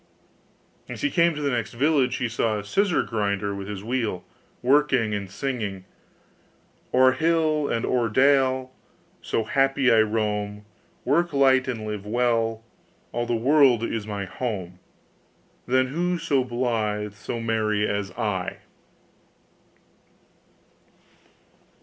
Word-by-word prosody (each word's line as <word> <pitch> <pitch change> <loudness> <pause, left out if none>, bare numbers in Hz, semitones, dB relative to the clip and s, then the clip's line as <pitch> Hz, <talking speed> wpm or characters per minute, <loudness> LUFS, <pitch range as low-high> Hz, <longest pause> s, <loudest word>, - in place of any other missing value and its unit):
As - - -7
he 285 - +1
came 170 -2 +3
to 150 - -4
the 140 - +1
next 120 -3 -2
village, 135 0 +2
he 125 - -1
saw 115 -1 0
a 105 - -5
scissor 195 - +1
grinder 100 -2 -2
with 100 0 -6
his 100 -1 -6
wheel, 115 -5 -2 0.4
working 130 -4 +3
and 100 -2 -4
singing, 100 -4 -4 1.1
'O'er 130 0 +5
hill 160 -1 +1
and 115 - -1
o'er 120 -3 +1
dale 130 +1 +2 0.5
So 115 - -1
happy 135 +2 +2
I 115 - +5
roam, 105 -1 -2 0.4
Work 170 +4 +1
light 135 -1 +4
and 115 -4 -4
live 105 -2 -4
well, 115 -1 0 0.5
All 120 0 -2
the 120 - 0
world 130 -1 +4
is 115 -2 -3
my 100 -2 -4
home; 95 -5 -5 0.9
Then 130 +1 +2
who 175 +5 -1
so 145 -6 +1
blythe, 110 -4 -2
so 105 +3 -6
merry 110 -2 0
as 100 -1 -2
I? 95 -4 -2
120 Hz, 125 wpm, -24 LUFS, 105-135 Hz, 1.1 s, O'er